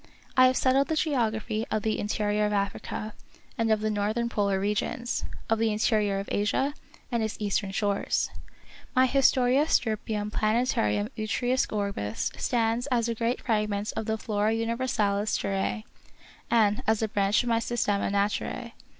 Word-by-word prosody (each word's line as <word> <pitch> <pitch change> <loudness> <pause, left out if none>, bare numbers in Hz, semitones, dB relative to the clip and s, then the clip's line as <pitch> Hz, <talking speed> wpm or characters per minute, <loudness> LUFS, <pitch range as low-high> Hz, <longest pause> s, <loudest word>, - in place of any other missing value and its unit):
I 255 -1 +7
have 255 - +1
settled 270 +2 +3
the 320 - 0
geography 225 -7 0
of 215 -1 -1
the 220 -1 0
interior 210 0 0
of 210 - -2
Africa, 205 +1 -3 0.4
and 225 -1 +1
of 215 -1 +2
the 215 0 0
northern 215 +3 0
polar 200 -4 +1
regions; 210 +5 -1 0.2
of 225 -1 +1
the 225 -1 +2
interior 210 -2 +1
of 195 - -4
Asia, 210 +7 +1 0.4
and 235 -1 0
its 220 -1 -2
eastern 200 -1 -1
shores. 200 0 0 0.6
My 255 0 +6
Historia 265 +1 +3
Stirpium 215 -4 0
Plan 220 +3 +1
tarum 105 - 0
U 215 0 -3
triusque 250 +3 0
Orbis 200 - -2
stands 235 +1 0
as 240 -3 +1
a - - 0
grand 230 +2 -1
frag 215 -3 0
ment 205 +1 -2
of 220 - -3
the 220 0 0
Flora 215 -1 0
Universalis 225 -3 0
Terrae, 195 +3 -2 0.7
and 215 -3 +3
as 220 0 +2
a - - +1
branch 205 +2 +2
of 245 - -2
my 230 -1 +3
Systema 220 -4 0
Naturae. 200 +1 -1
215 Hz, 165 wpm, -27 LUFS, 205-235 Hz, 0.7 s, I